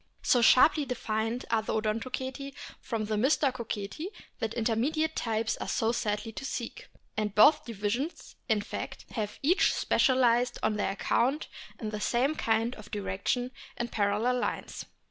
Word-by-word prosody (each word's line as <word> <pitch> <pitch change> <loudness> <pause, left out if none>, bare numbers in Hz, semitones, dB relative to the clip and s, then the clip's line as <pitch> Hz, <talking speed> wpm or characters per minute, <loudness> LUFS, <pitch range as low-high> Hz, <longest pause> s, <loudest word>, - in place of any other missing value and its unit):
So 245 - +4
sharply 290 +6 +6
defined 225 -2 -2
are 225 -1 +3
the 220 - -3
Odontoceti 255 +5 -3 0.2
from 225 -3 -3
the 215 0 -1
Mystacoceti 255 - 0 0.3
that 225 0 -2
intermediate 260 +8 0
types 225 -1 -1
are - - -5
sadly 225 -1 0
to 225 - -7
seek; 245 -3 -5 0.3
and 210 -1 -2
both 290 +9 +6
divisions, 230 - -3
in 215 -2 +3
fact, 205 - -6
have 210 -3 -3
each 345 +7 +4
specialised 250 -2 +3
on 220 -1 +2
their 205 - 0
account 260 +8 +1 0.3
in 215 -3 -4
the 210 -1 -4
same 255 +7 +2
kind 230 -4 +1
of 210 -1 -11
direction 210 +5 -2 0.3
in 240 0 -2
parallel 215 +4 +1
lines. - - -3
230 Hz, 145 wpm, -29 LUFS, 215-255 Hz, 0.3 s, sharply